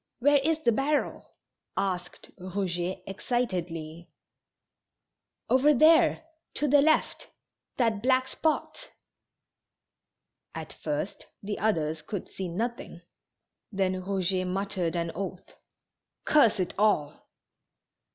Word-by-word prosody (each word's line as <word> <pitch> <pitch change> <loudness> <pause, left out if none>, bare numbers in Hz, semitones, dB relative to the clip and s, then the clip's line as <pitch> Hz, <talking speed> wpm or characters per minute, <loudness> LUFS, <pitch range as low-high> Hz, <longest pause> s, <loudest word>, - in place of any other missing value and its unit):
Where 285 +3 +4
is 310 +3 +1
the 255 -7 +2
barrel?" 280 +6 -1 0.5
asked 180 -2 -3
Eouget, 185 -1 -3
excitedly. 175 -7 -3 1.4
"Over 285 +3 +4
there, 320 +5 +5 0.3
to 295 - 0
the 285 +1 +5
left; 315 +2 +1 0.5
that 225 -5 +1
black 255 +1 +2
spot." 320 - -2 1.7
At - - -7
first - - -4 0.2
the 205 +1 -4
others 160 -7 0
could 200 +1 -5
see 190 - -5
nothing, 235 +9 -4 0.7
then 190 -2 0
Eouget 185 0 -1
muttered 185 -2 -2
an 170 -1 -1
oath: 190 0 -6 0.7
"Curse 230 -8 +4
it 180 - -1
all 205 -9 +1
200 Hz, 100 wpm, -28 LUFS, 180-260 Hz, 1.7 s, there